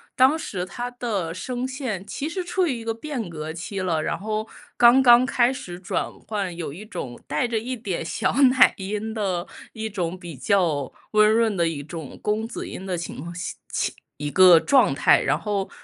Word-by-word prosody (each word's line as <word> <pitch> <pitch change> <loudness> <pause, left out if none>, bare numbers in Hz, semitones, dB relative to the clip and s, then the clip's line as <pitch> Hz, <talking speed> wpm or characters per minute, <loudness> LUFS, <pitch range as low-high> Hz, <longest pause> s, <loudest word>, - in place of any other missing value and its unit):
当 265 +5 +5
时 185 - -4
他 240 +7 -5
的 210 -9 -3
声 250 +7 -4
线 255 -8 -4
其 280 +7 -4
实 360 +2 -3
处 360 +1 0
于 285 - 0
一 - - -8
个 225 0 -1
变 235 - -5
革 155 -1 -6
期 175 +4 -5
了， 175 -4 0
然 - - -1
后 215 +1 -3 0.3
刚 240 +2 +7
刚 245 -1 +7
开 250 0 +2
始 180 -9 -8
转 185 - -2 0.2
换， 200 -5 -3
有 165 -5 -5
一 185 +7 -9
种 130 - -6
带 150 +10 0
着 235 -1 -1
一 255 +3 -4
点 190 -6 -3
小 - - -1
奶 260 -1 +6
音 210 +3 -4
的 190 -5 -2 0.3
一 220 0 -4
种 180 -3 -3
比 170 -4 -8
较 155 - +1 0.2
温 215 0 +5
润 225 -2 +2
的 170 -2 +2
一 150 -3 -4
种 160 -2 -8
公 215 +1 0
子 230 - -6
音 190 - -7
的 185 -2 -2
情 170 - -6
况 170 +2 -7
下 175 - -5 0.2
情 - - -1 0.2
一 145 0 -3
个 180 -3 +8
状 270 +6 +4
态。 - - +4
然 - - +1
后 200 -2 -2
205 Hz, 220 characters per minute, -24 LUFS, 175-240 Hz, 0.3 s, 个